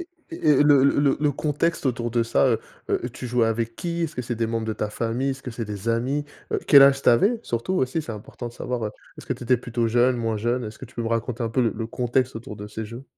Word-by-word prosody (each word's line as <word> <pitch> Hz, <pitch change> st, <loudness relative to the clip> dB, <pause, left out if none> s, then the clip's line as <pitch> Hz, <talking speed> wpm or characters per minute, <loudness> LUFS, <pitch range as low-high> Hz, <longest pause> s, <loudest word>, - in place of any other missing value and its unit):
et 345 Hz, -, -8 dB, 0.2 s
et 330 Hz, -, -2 dB
et -, -, +6 dB
le 145 Hz, -2 st, +6 dB
le 140 Hz, -, +3 dB
le 140 Hz, -1 st, +3 dB
le 150 Hz, -1 st, +2 dB
contexte 150 Hz, +3 st, -1 dB
autour 120 Hz, -2 st, -1 dB
de 120 Hz, 0 st, +2 dB
ça, 115 Hz, +3 st, +2 dB
heu 115 Hz, -3 st, +1 dB, 0.3 s
heu, -, -, +2 dB
tu 125 Hz, -, -7 dB
jouais 120 Hz, -1 st, +2 dB
avec 115 Hz, +1 st, -2 dB
qui? 170 Hz, -1 st, -3 dB
Est-ce 160 Hz, -2 st, -3 dB
que 125 Hz, -, -2 dB
c'est 120 Hz, 0 st, -3 dB
des 115 Hz, 0 st, -1 dB
membres 115 Hz, 0 st, -2 dB
de 110 Hz, -, -1 dB
ta 105 Hz, -1 st, -3 dB
famille? 120 Hz, +5 st, -1 dB
Est-ce 135 Hz, 0 st, -6 dB
que 125 Hz, -, -6 dB
c'est 115 Hz, 0 st, -4 dB
des 105 Hz, +1 st, -5 dB
amis? 130 Hz, +6 st, 0 dB, 0.3 s
Heu, -, -, +2 dB
quel 140 Hz, -1 st, +9 dB
âge 135 Hz, 0 st, +6 dB
tu -, -, +3 dB
avais? 200 Hz, -, +4 dB
Surtout, 120 Hz, +11 st, -2 dB
aussi, 155 Hz, 0 st, 0 dB
c'est 120 Hz, -, -6 dB
important 110 Hz, +3 st, -7 dB
de -, -, -13 dB
savoir, 120 Hz, -1 st, -3 dB
heu, -, -, -4 dB, 0.3 s
est-ce -, -, -12 dB
que -, -, 0 dB
tu -, -, -7 dB
étais 125 Hz, +1 st, +4 dB
plutôt 120 Hz, -1 st, -2 dB
jeune, 120 Hz, +2 st, +3 dB
moins 115 Hz, -2 st, -1 dB
jeune? 120 Hz, +3 st, -1 dB
Est-ce 110 Hz, 0 st, -8 dB
que -, -, -8 dB
tu 130 Hz, -, -16 dB
peux 120 Hz, -, -2 dB
me 115 Hz, -, -2 dB
raconter 115 Hz, +1 st, -2 dB
un -, -, -1 dB
peu 115 Hz, +3 st, 0 dB
le 115 Hz, -, +1 dB
le 115 Hz, -, -4 dB
contexte 125 Hz, +2 st, 0 dB
autour 115 Hz, -2 st, -7 dB
de 105 Hz, -, -7 dB
ces 110 Hz, +1 st, -6 dB
jeux? 115 Hz, +5 st, -9 dB
120 Hz, 295 wpm, -24 LUFS, 115-135 Hz, 0.3 s, quel